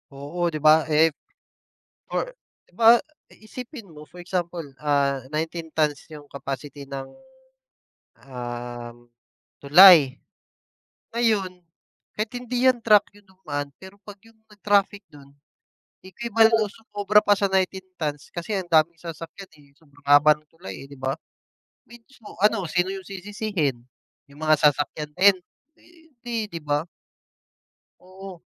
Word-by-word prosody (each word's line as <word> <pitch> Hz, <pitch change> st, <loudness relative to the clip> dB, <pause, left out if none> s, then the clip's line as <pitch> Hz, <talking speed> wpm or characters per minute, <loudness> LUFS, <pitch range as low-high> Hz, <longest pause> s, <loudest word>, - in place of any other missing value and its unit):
Oo 155 Hz, +6 st, -3 dB
'di 155 Hz, -, -4 dB
ba, 155 Hz, +1 st, +5 dB
eh. 155 Hz, +2 st, +5 dB, 1.0 s
For -, -, -1 dB, 0.4 s
'di -, -, -30 dB
ba 230 Hz, +1 st, +7 dB, 0.3 s
isipin 235 Hz, +2 st, -10 dB
mo, 150 Hz, -, -12 dB
for 165 Hz, +3 st, -16 dB
example 175 Hz, -2 st, -4 dB, 0.2 s
ah 140 Hz, -2 st, +1 dB
19 160 Hz, +1 st, -4 dB
tons 150 Hz, -3 st, 0 dB
yung 150 Hz, -2 st, -11 dB
capacity 140 Hz, +1 st, -7 dB
ng 135 Hz, -1 st, -5 dB, 1.2 s
um 120 Hz, -2 st, -8 dB, 0.6 s
tulay. 150 Hz, -2 st, +8 dB, 1.0 s
Ngayon 195 Hz, -6 st, 0 dB, 0.5 s
kahit 215 Hz, +1 st, -3 dB
hindi 250 Hz, +1 st, +1 dB
yan 255 Hz, -, +1 dB
truck 210 Hz, -2 st, +6 dB
yung 205 Hz, -, -22 dB
dumaan 145 Hz, -7 st, -6 dB
pero 190 Hz, +1 st, -13 dB
pag 205 Hz, -1 st, -11 dB
yung 225 Hz, 0 st, -22 dB
nag-traffic 205 Hz, -1 st, 0 dB
dun, 140 Hz, -1 st, -17 dB, 0.7 s
equivalent 225 Hz, +4 st, +2 dB
o 215 Hz, -, +1 dB
sumobra 210 Hz, 0 st, +1 dB
pa 205 Hz, -, +1 dB
sa 200 Hz, -, +2 dB
19 190 Hz, 0 st, -1 dB
tons 150 Hz, -4 st, -4 dB
kasi 170 Hz, +4 st, -5 dB
ang 185 Hz, -, -7 dB
daming 165 Hz, 0 st, +2 dB
sasakyan 165 Hz, +3 st, -9 dB
eh, 145 Hz, -2 st, -22 dB
sobrang 145 Hz, -3 st, -24 dB
haba 145 Hz, +2 st, +6 dB
ng 150 Hz, -, -22 dB
tulay 95 Hz, -, -9 dB
eh 140 Hz, -, -15 dB
'di 140 Hz, -, -12 dB
ba. 135 Hz, +1 st, -2 dB, 0.7 s
Mismo 235 Hz, -4 st, -16 dB
ano 210 Hz, -1 st, +2 dB
sino 180 Hz, +1 st, +1 dB
yung 190 Hz, 0 st, -6 dB
sisisihin? 190 Hz, -, -3 dB, 0.5 s
Yung 145 Hz, -, -16 dB
mga 155 Hz, 0 st, +3 dB
sasakyan 150 Hz, +1 st, +1 dB
din? 190 Hz, +4 st, +5 dB, 0.4 s
Eh, 330 Hz, -2 st, -23 dB, 0.2 s
di 230 Hz, -3 st, -3 dB
'di 170 Hz, -4 st, -7 dB
ba. 150 Hz, +2 st, -1 dB, 1.1 s
Oo. 185 Hz, -1 st, -12 dB
175 Hz, 135 wpm, -24 LUFS, 145-205 Hz, 1.2 s, tulay